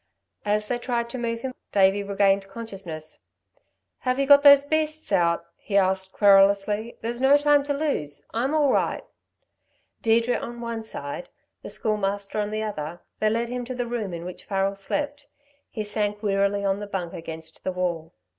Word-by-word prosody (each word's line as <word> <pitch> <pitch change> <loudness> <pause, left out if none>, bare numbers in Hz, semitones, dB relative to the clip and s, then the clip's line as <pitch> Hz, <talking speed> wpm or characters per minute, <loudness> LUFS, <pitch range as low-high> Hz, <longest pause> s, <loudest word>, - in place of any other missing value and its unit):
As 210 0 +1
they 240 +1 -1
tried 235 -1 -2
to 255 - -5
move 230 -1 -2
him, 260 0 -4 0.2
Davey 195 0 +4
regained 200 -1 +2
consciousness. 195 -7 -7 0.8
"Have 255 0 0
you 275 - +2
got 285 0 +8
those 280 -1 +8
beasts 310 +1 -1
out?" 170 -1 +2
he 200 - -1
asked 190 0 +2
querulously. 200 +2 +4
"There's 235 +2 -3
no 275 +2 +6
time 290 0 +4
to 285 - 0
lose. 275 - -2
I'm 260 +7 0
all 290 -3 +4
right." - - 0 1.0
Deirdre 230 +2 +3
on 240 0 -7
one 235 -1 -4
side, 145 -6 -6 0.3
the - - -8
Schoolmaster 205 -1 -1
on 205 0 -1
the 215 +1 -2
other, 170 -5 -5 0.2
they 215 - +3
led 230 +2 -1
him 250 0 -3
to 255 +1 -5
the 245 -1 -2
room 235 -5 -3
in 170 0 -6
which 180 - -8
Farrel 195 0 0
slept. 290 +9 -3 0.4
He 215 - -4
sank 205 0 -2
wearily 200 0 +1
on 195 0 +1
the 205 - -6
bunk 180 -4 -4
against 160 -1 -9
the 185 - -1
wall. 175 -2 -3
210 Hz, 175 wpm, -25 LUFS, 195-240 Hz, 1.0 s, got